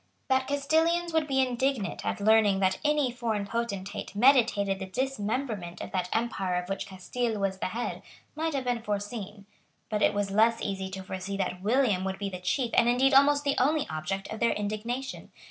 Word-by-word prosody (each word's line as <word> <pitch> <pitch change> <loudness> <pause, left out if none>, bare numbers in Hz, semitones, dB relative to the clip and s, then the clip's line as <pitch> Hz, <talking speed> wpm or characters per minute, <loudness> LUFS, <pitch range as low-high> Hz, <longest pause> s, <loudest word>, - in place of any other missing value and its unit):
That 260 0 +2
Castilians 320 +4 +1
would 320 -2 +2
be 265 -2 +2
indignant 250 -3 -1
at - - -2
learning 210 -2 +4
that 190 -1 +1
any 295 -4 +2
foreign 230 -4 -2
potentate 200 -3 -4
meditated 220 -5 +4
the 190 - -5
dismemberment 220 -5 -3
of - - -6
that 180 -1 -1
empire 195 -5 -1
of 180 +1 -3
which 195 0 -3
Castile 220 +4 -3
was 195 -1 -1
the - - -1
head 230 +6 -4 0.3
might 320 0 -1
have 270 - -1
been 245 -2 -1
foreseen. 205 -1 -5 0.5
But 210 -1 0
it - - +3
was 205 -1 -1
less 225 +3 +4
easy 190 -1 -3
to 190 0 -6
foresee 190 +1 -5
that 180 -1 -2
William 215 -3 +2
would 190 0 -2
be 200 0 -4
the 180 - -6
chief 235 +6 -1
and 235 - +4
indeed 265 +3 +3
almost 285 +1 +5
the 280 -1 +2
only 295 +3 +2
object 155 +5 -3
of 220 - -6
their 235 - +3
indignation. 215 +6 -4
220 Hz, 190 wpm, -28 LUFS, 195-260 Hz, 0.5 s, almost